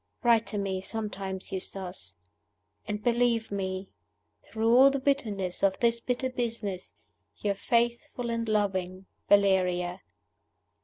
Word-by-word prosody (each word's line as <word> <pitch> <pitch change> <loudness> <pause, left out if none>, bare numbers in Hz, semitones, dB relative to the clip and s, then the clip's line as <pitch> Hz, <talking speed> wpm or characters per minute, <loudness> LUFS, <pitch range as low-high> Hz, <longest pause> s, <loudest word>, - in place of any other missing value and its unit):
"Write 230 -1 +4
to 210 - -4
me, 195 -2 -1
sometimes, 195 -3 -5
Eustace; 185 - -5 0.7
and 210 0 -3
believe 235 -2 +2
me, 190 -1 -3 0.6
through 225 +1 +3
all 265 +2 +8
the 275 - 0
bitterness 220 -10 -1
of 195 -1 +2
this 235 -1 +2
bitter 250 +2 -2
business, 225 -7 -4 0.4
your 205 -1 0
faithful 235 +3 0
and 230 -1 -2
loving 190 -3 0 0.2
"VALERIA." 185 -2 +3
210 Hz, 115 wpm, -29 LUFS, 190-235 Hz, 0.7 s, all